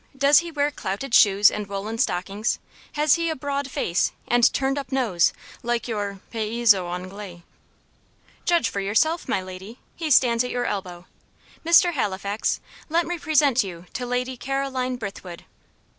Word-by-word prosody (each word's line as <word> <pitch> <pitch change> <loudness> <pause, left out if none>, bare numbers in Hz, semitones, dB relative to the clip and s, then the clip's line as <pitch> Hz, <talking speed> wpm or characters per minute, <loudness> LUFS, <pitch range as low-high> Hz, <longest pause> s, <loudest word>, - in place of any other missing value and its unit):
Does 280 +2 +6
he 340 0 -5
wear 295 -2 0
clouted 230 +1 -5
shoes 205 -2 +6
and 210 -1 -4
woollen 200 +3 -5
stockings? 200 0 -1 0.4
Has 300 -1 +3
he 335 - 0
a 320 - -2
broad 280 0 -3
face 175 -8 0 0.2
and 240 -1 +4
turned 270 +1 0
up 270 -2 -8
nose, 230 -10 +2 0.3
like 240 0 -2
your 205 -4 -4
'paysans 225 0 +3
Anglais'?" 180 0 -6 1.0
"Judge 340 -8 +2
for 200 - -3
yourself, 225 - +1
my 190 - 0
lady 185 +5 -9 0.2
he 325 -2 -3
stands 245 -4 +4
at 250 - -4
your 245 0 -2
elbow. 180 -4 -4 0.6
Mr. 340 +2 +5
Halifax, 200 -4 -1 0.3
let 335 +2 +2
me 350 0 -4
present 290 -6 +3
you 175 -3 -8
to 250 - -4
Lady 250 +1 -2
Caroline 265 -1 -2
Brithwood." 195 -5 -8
235 Hz, 155 wpm, -24 LUFS, 200-275 Hz, 1.0 s, Does